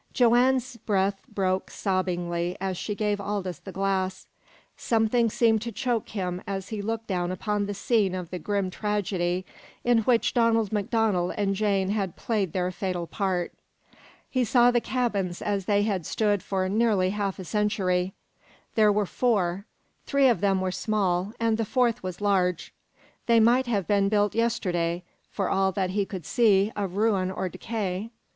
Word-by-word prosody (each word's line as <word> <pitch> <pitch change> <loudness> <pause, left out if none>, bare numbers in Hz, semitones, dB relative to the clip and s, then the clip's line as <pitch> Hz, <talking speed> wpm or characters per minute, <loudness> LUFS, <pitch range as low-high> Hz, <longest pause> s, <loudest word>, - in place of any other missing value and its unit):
Joanne's 245 0 +3
breath 195 -2 0
broke 190 -3 -1
sobbingly 175 -2 -1
as 190 0 -2
she 210 +4 -4
gave 205 -1 -1
Aldous 195 -5 -3
the 195 - -9
glass. 190 -1 -1 0.5
Something 230 +1 +2
seemed 220 -1 +2
to 235 +1 -4
choke 230 +1 -2
him 180 -3 -3
as 195 -1 -4
he 215 -2 -4
looked 225 +2 -3
down 180 -3 -1
upon 205 +2 -1
the 205 - -4
scene 200 -2 +1
of 180 -2 -6
the 180 - -4
grim 200 +1 -1
tragedy 185 -3 -1 0.4
in 240 -1 +4
which 230 +1 +2
Donald 230 -3 +2
MacDonald 205 -3 0
and 200 -1 +1
Jane 195 -2 +1
had 195 -4 -1
played 205 -7 -1
their 180 0 -1
fatal 180 -2 -3
part. 185 -1 -2 0.7
He 255 -1 0
saw 245 0 +4
the 240 -1 +2
cabins 205 -10 -1
as 200 -2 -2
they 205 0 +2
had 195 -6 -1
stood 205 -3 +1
for 190 -1 -1
nearly 200 -2 +2
half 200 -2 -2
a 185 - -7
century. 190 -1 0 0.6
There 215 -1 +5
were 205 0 +1
four. 200 -3 0 0.4
Three 280 -1 +4
of 240 -5 +2
them 195 -2 +2
were 185 0 -1
small, 195 -2 0
and 230 -1 +1
the - - +2
fourth 240 +1 +1
was 185 -1 -5
large. 185 -4 0 0.5
They 230 -1 +5
might 240 +3 +4
have 205 -6 0
been 200 0 +2
built 205 -1 +2
yesterday, 180 -7 0 0.3
for 195 -3 -2
all 190 0 +2
that 185 -1 -1
he 200 0 0
could 185 -6 -7
see 210 -2 +3
of 195 -3 -3
ruin 205 -4 +2
or 190 0 -3
decay. 195 +1 -4
200 Hz, 165 wpm, -26 LUFS, 185-220 Hz, 0.7 s, There